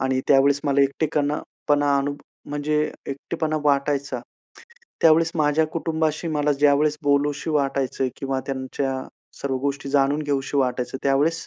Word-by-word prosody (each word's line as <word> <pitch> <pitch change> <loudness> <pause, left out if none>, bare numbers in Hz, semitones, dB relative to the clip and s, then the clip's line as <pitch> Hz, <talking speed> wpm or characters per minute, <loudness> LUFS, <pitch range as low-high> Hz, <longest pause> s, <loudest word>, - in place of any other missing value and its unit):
आणि 130 0 +1
त्यावेळेस 140 0 +4
मला 140 -1 +3
एकटेपणा 150 +1 0 0.3
पणा, 145 -1 +3 0.5
म्हणजे 150 +1 -1 0.3
एकटेपणा 155 +3 -3
वाटायचा. 140 -2 +1 0.8
त्यावेळेस 165 +1 +5
माझ्या 155 0 +2
कुटुंबाशी 160 0 -2
मला 150 -1 +1
ज्यावेळेस 145 +1 +3
बोलावसं 145 +2 +1
वाटायचं 135 -3 0
किंवा 135 -1 -2
त्यांच्या 130 0 -3 0.4
सर्व 135 -1 -1
गोष्टी 140 0 -3
जाणून 140 +2 +2
घ्यावसं 140 -1 -2
वाटायचं 125 0 -1
त्यावेळेस, 145 +4 +1
145 Hz, 120 wpm, -23 LUFS, 135-150 Hz, 0.8 s, त्यावेळेस